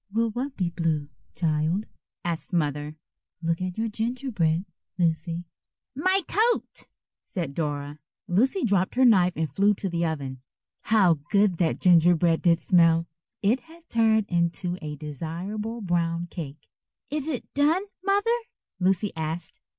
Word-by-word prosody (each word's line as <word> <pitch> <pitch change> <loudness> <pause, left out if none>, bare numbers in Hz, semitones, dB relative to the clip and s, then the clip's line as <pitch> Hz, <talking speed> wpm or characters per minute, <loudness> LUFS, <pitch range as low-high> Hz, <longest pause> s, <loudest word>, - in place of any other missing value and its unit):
"Will 225 +1 +1
what 265 +5 -4
be 180 -3 0
blue, 160 -4 -1 0.3
child?" 160 +4 0 0.4
asked 170 +2 -3
Mother. 150 -2 -1 0.5
"Look 165 +1 0
at 185 -1 -3
your 225 +1 0
gingerbread, 220 -7 -1 0.3
Lucy." 170 0 0 0.5
"My 370 +6 +2
coat," 455 +4 0 0.3
said 170 -8 -4
Dora. 145 -1 -3 0.3
Lucy 260 - +2
dropped 195 -3 +1
her 260 +1 +5
knife 185 -6 +5
and 160 0 0
flew 200 +5 +3
to 195 - -3
the 170 -1 -1
oven. 135 -5 -4 0.4
How 190 -8 +4
good 200 -3 +3
that 165 -2 +1
gingerbread 175 -1 +4
did 170 -2 +4
smell! 165 -1 +4 0.4
It 225 +6 +3
had 330 +2 -18
turned 220 -2 +3
into 175 +1 0
a 150 -2 -5
desirable 175 - -5
brown 170 -2 0
cake. 150 -3 -7 0.4
"Is 300 0 -2
it 280 -7 -4
done, 305 +7 +3 0.2
Mother?" 405 +4 +2 0.4
Lucy 190 +2 +1
asked. 160 +1 -4
180 Hz, 135 wpm, -26 LUFS, 165-225 Hz, 0.5 s, her